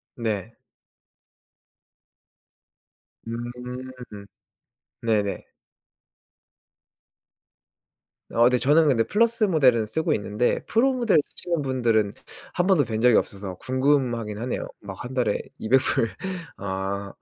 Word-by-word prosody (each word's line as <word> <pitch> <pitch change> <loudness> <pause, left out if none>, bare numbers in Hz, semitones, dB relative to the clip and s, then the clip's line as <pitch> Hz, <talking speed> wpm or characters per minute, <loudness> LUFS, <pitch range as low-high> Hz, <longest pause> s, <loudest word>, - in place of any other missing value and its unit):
네. 110 -2 -3 2.7
음. 125 -1 -7 0.8
네네. 105 -3 0 2.9
어 115 - +2
근데 125 +1 +5
저는 150 +5 +4
근데 120 -5 +3
플러스 230 - +2
모델은 130 - +4
쓰고 160 +7 0
있는데 105 +3 -1
프로 260 +4 +3
모델을 235 - +3
쓰시는 170 +1 -4
분들은 115 -6 +1 0.4
1 175 - +1
번도 185 -8 +4
뵌 110 -1 -3
적이 120 -1 +5
없어서 95 -2 -2
궁금하기는 130 -5 0
하네요. 125 +1 -3
막 100 -2 -8
1 125 - -6
달에 125 -5 0 0.2
200 130 +4 +3
불 115 -4 +1 0.5
아. 100 0 -3
120 Hz, 190 characters per minute, -25 LUFS, 110-145 Hz, 2.9 s, 근데